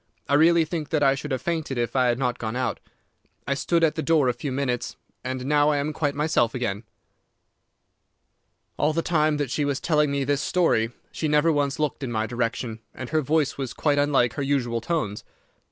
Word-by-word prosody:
I - - -1
really 165 +2 +5
think 155 -2 -4
that 155 -2 +1
I 135 -1 +5
should 150 +2 -5
have 130 -3 -2
fainted 160 -6 -2
if 120 0 -2
I 130 -1 +3
had 120 -1 +1
not 125 -2 -1
gone 110 0 -3
out. 130 0 -1 0.7
I 140 - 0
stood 165 +4 +1
at 160 - +4
the 160 - -3
door 160 -3 +3
for - - +3
a - - +1
few 125 +4 -5
minutes, 130 -2 -2 0.3
and 130 0 -4
now 145 +1 +3
I 150 - +2
am 145 +2 -2
quite 145 -1 -1
myself 145 -6 +1
again.' 110 -3 -3 1.9
"All 150 +1 +2
the 165 +1 0
time 155 -3 +2
that 145 -4 -2
she 150 - 0
was 140 -1 -1
telling 150 -3 +2
me 140 0 0
this 140 +1 0
story 150 -11 +1 0.2
she 155 - -2
never 150 +2 +3
once 145 -2 0
looked 150 -2 -2
in 130 -3 -3
my 110 -1 0
direction, 115 0 -3 0.2
and 130 - -7
her 155 0 +1
voice 150 0 0
was 130 -3 -3
quite 145 -2 +1
unlike 140 -5 +2
her 145 - -4
usual 125 -4 0
tones. 115 -8 -2
140 Hz, 215 wpm, -25 LUFS, 125-150 Hz, 1.9 s, really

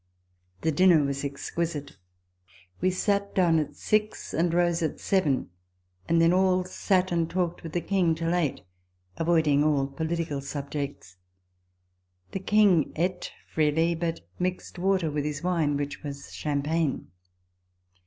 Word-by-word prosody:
The 160 - +1
dinner 170 -1 +5
was 140 0 -2
exquisite. 145 +1 -4 0.8
We 185 - +2
sat 200 +2 0
down 170 -4 +4
at 150 - -3
six, 215 0 -1
and 170 +1 +1
rose 175 0 +2
at 160 -3 -2
seven; 150 - +1 0.6
and 165 0 +4
then 165 +1 +5
all 185 0 +3
sat 185 0 0
and 165 -1 +1
talked 175 -1 -1
with 165 -2 -8
the 175 - 0
King 180 -4 +1
till 165 +1 -1
eight, 170 -6 0 0.6
avoiding 160 -4 +3
all 145 -3 +2
political 160 +1 -3
subjects. 140 -8 -5 1.1
The - - -3
King 195 -5 +3
eat 180 +2 -1 0.2
freely, 160 +2 +2
but 165 0 -3 0.2
mixed 180 0 -3
water 185 -3 +1
with 145 0 -1
his 150 +1 -4
wine, 165 -5 +1
which 145 0 -4
was 140 -1 -8
champagne. 150 - -1
165 Hz, 135 wpm, -27 LUFS, 145-180 Hz, 1.1 s, dinner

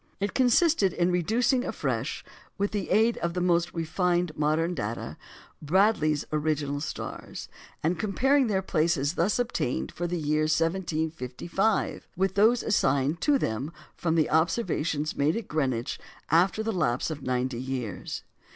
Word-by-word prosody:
It 200 +1 -2
consisted 255 - +3
in 175 +1 +1
reducing 235 - +2
afresh, - - -3 0.3
with 200 +1 0
the 205 -3 -3
aid 225 +2 +3
of 170 0 -2
the - - 0
most 175 -1 +2
refined 175 0 0
modern 155 +3 +1
data, 115 -7 -4 0.5
Bradley's 155 -3 +2
original 150 -2 -1
stars, 160 - -6 0.4
and 165 +3 0
comparing 260 +6 +2
their 190 -3 0
places 155 -4 +1
thus 180 +4 +1
obtained 240 - -1
for 175 - -3
the 175 +1 -2
year 155 -1 +1
1755 165 - -1
with 190 0 +1
those 220 +4 +4
assigned 140 -5 +1
to 290 -2 +4
them 135 - -2 0.2
from 165 -1 0
observations 160 -3 0
made 150 +6 +1
at 230 - -5
Greenwich 130 -6 -1 0.3
after 185 +6 +3
the 225 0 -1
lapse 130 -5 0
of 150 -2 -6
ninety 125 -1 -1
years. 130 -6 -4
170 Hz, 140 wpm, -27 LUFS, 150-195 Hz, 0.5 s, those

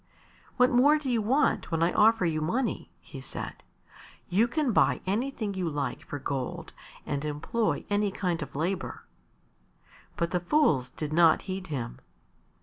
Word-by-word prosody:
"What 250 0 +5
more 285 +5 +5
do 280 -4 -3
you 230 -2 +2
want 260 +8 +1
when 165 -1 +1
I 170 - +2
offer 225 -3 +4
you 155 -2 0
money?" 235 +11 -1
he - - -10
said. - - -7 0.7
"You 205 +6 +3
can 285 +1 0
buy - - +3
anything 215 +1 -1
you 185 -3 -2
like 145 -4 -3
for 145 - -4
gold 135 -2 -4 0.3
and 145 -1 -2
employ 155 +10 -1
any 205 0 +1
kind 180 -3 -2
of 150 - -7
labour." 175 +6 -2 1.1
But 170 -1 -1
the 180 - +1
fools 175 - +2
did 155 -1 -5
not 165 -1 +5
heed 190 -1 -5
him. 125 - -5
185 Hz, 155 wpm, -28 LUFS, 155-230 Hz, 1.1 s, What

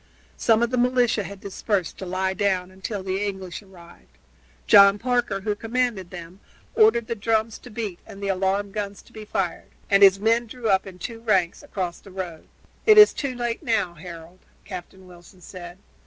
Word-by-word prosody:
Some 225 0 +3
of 235 - 0
the 250 - +1
militia 245 -3 +2
had 200 0 -8
dispersed 200 -1 -2
to 190 - -6
lie 190 +1 -1
down 190 -2 0
until 190 +1 -5
the 190 +1 -2
English 190 -3 -5
arrived. 180 -4 -18 0.5
John 200 -1 +7
Parker, 240 -4 -1
who 210 +1 -1
commanded 225 -3 -2
them, 175 +1 -10 0.3
ordered 430 - +4
the 230 - -3
drums 220 0 -1
to - - -13
beat 210 -5 -5
and 195 - -11
the 200 - -4
alarm 195 +1 0
guns 200 -1 -5
to - - -22
be 215 -1 -9
fired, 185 -4 -3 0.2
and 195 0 +5
his 195 -1 +7
men 230 +3 +2
drew 230 -1 -4
up 190 0 +2
in 185 -1 -10
two 225 +5 -7
ranks 190 -7 +1
across 185 - -4
the - - -15
road. 185 -4 -7 0.4
"It 430 -1 +7
is 425 0 +9
too 275 -3 -3
late 240 -1 -3
now, 210 -7 0
Harold," 170 +1 -11 0.3
Captain 185 0 -9
Wilson 180 +1 -16
said. 175 -1 -10
200 Hz, 185 wpm, -24 LUFS, 185-225 Hz, 0.5 s, is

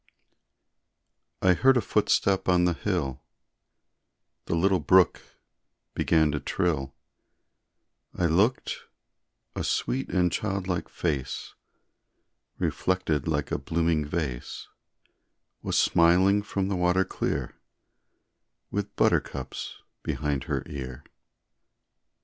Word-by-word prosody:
I 95 -1 +6
heard 130 +8 +4
a - - +4
footstep 100 -3 +1
on 90 -1 +4
the 90 - +2
hill, 80 -8 -2 1.2
The - - -1
little 95 +2 +3
brook 95 -1 +4 0.7
began 80 -2 +2
to 75 - -2
trill, 70 -8 -1 1.2
I 90 - +1
looked 100 +10 +1 0.8
a - - -2
sweet 135 +2 -1
and 90 -2 +2
childlike 95 -4 -2
face, 70 -6 -3 1.0
Reflected 90 -6 0
like 75 -3 -1
a - - 0
blooming 80 -2 0
vase, 75 -5 -4 0.9
Was - - -1
smiling 95 +4 +4
from 100 -2 -2
the 100 - -1
water 90 +1 +2
clear, - - -3 1.2
With - - -3
buttercups - - -1 0.2
behind 70 -3 -2
her - - -2
ear. 65 -3 -7
90 Hz, 95 wpm, -27 LUFS, 75-95 Hz, 1.2 s, I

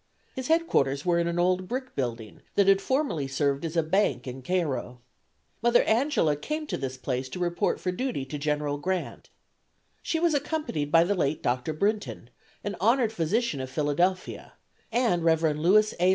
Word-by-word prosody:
His 260 -1 -5
headquarters 145 - +1
were 175 -1 +3
in 170 - +1
an 170 0 -2
old 180 +1 +1
brick 255 +2 -4
building 115 -5 -4
that 200 -1 +4
had 195 0 +5
formerly 260 - 0
served 140 +1 0
as 165 +1 -3
a 165 - +3
bank 155 - +1
in 130 0 -7
Cairo. 140 -6 -2 0.6
Mother 240 +1 +4
Angela 230 - +2
came 305 - -4
to - - -3
this 130 -1 -4
place 130 0 -3
to - - -7
report 175 -1 0
for 180 - -1
duty 210 - -3
to 145 +2 -6
General 150 0 -1
Grant. 185 +3 -3 0.7
She 325 - -1
was 340 -1 +2
accompanied 285 - -2
by 165 +1 +6
the 190 +4 +1
late 155 -5 -1
Dr. 125 +4 0
Brinton, 200 - -2 0.3
an 205 -1 -3
honored 230 +1 +3
physician 175 - 0
of 130 - -5
Philadelphia, 160 +7 -1 0.4
and 225 -8 +1
Rev. 165 0 +3
Louis 200 +8 +4
A. 180 +1 +4
175 Hz, 175 wpm, -27 LUFS, 145-215 Hz, 0.7 s, by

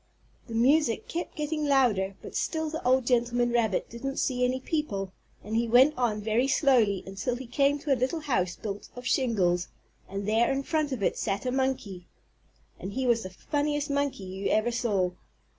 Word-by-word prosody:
The 230 - -6
music 255 +1 +3
kept 345 +1 -4
getting 300 -1 -2
louder 215 -9 +2
but - - -9
still 315 -1 -1
the 320 - -4
old 255 0 +3
gentleman 240 0 +2
rabbit 225 -5 +1
didn't 270 +4 -5
see 250 -2 0
any 255 +1 +1
people, 205 - -3 0.3
and 215 +2 -4
he 235 +1 +1
went 260 +6 +6
on 225 -4 0
very 225 +5 +1
slowly 250 - +3
until 195 +6 -3
he 260 +1 -7
came 280 +4 +2
to 290 -1 0
a 250 - -2
little 285 +6 0
house 185 -12 0
built 205 -2 -6
of 245 0 -9
shingles, 190 -10 +1 0.4
and 195 +1 -4
there 225 +2 +3
in 270 0 -1
front 305 -1 0
of 245 -6 -3
it - - 0
sat 195 +5 -2
a 250 - 0
monkey. 255 -9 -2 0.7
And 195 - -6
he 260 +1 -1
was 235 -2 +3
the 185 - -6
funniest 290 +8 -2
monkey 280 -7 -1
you 190 +1 -4
ever 215 +3 +2
saw. 205 -7 0
245 Hz, 190 wpm, -28 LUFS, 210-275 Hz, 0.7 s, went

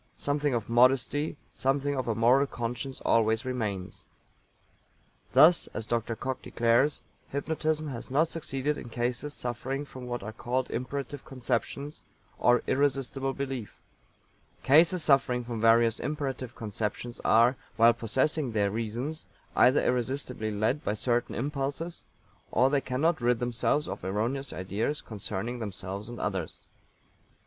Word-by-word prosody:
Something 145 -2 0
of 115 -3 -2
modesty, 130 +5 +3 0.2
something 140 +2 0
of 130 -2 -2
a 115 - 0
moral 125 +5 +4
conscience 125 +2 -4
always 110 +1 +3
remains. 105 -8 -3 1.3
Thus, 155 +6 +6
as 110 - -3
Dr. 115 0 -1
COCKE 130 +2 -4
declares, 120 +5 +2 0.3
Hypnotism 155 +2 -1
has 120 -4 -6
not 150 +5 +3
succeeded 150 -3 -2
in - - -9
cases 125 +5 -2
suffering 130 +4 -3
from 130 -3 -9
what 120 -3 -4
are 110 +2 -6
called 125 +3 -2
imperative 140 +2 -4
conceptions, 140 +3 -3 0.4
or 120 +1 +4
irresistible 135 -1 0
belief. 135 -5 -5 0.8
"Cases 165 +5 +5
suffering 135 -3 +3
from 115 -2 -4
various 115 0 +5
imperative 135 -4 -3
conceptions 115 +1 -4
are, 120 +3 +5 0.2
while 115 +1 +6
possessing 130 +4 0
their 100 -2 +2
reasons, 115 +8 -3 0.3
either 130 +3 +5
irresistibly 125 -2 -1
led 110 +7 0
by 105 - -1
certain 120 +3 0
impulses 145 +5 -3 0.5
or 130 +3 +4
they 140 -1 +2
cannot 145 +5 0
rid 120 0 +3
themselves 120 +5 0
of - - -6
erroneous 115 +8 -2
ideas 105 +10 -2
concerning 110 +3 -5
themselves 100 0 -5
and 120 - -7
others." 95 -5 -3
125 Hz, 130 wpm, -29 LUFS, 115-140 Hz, 1.3 s, Thus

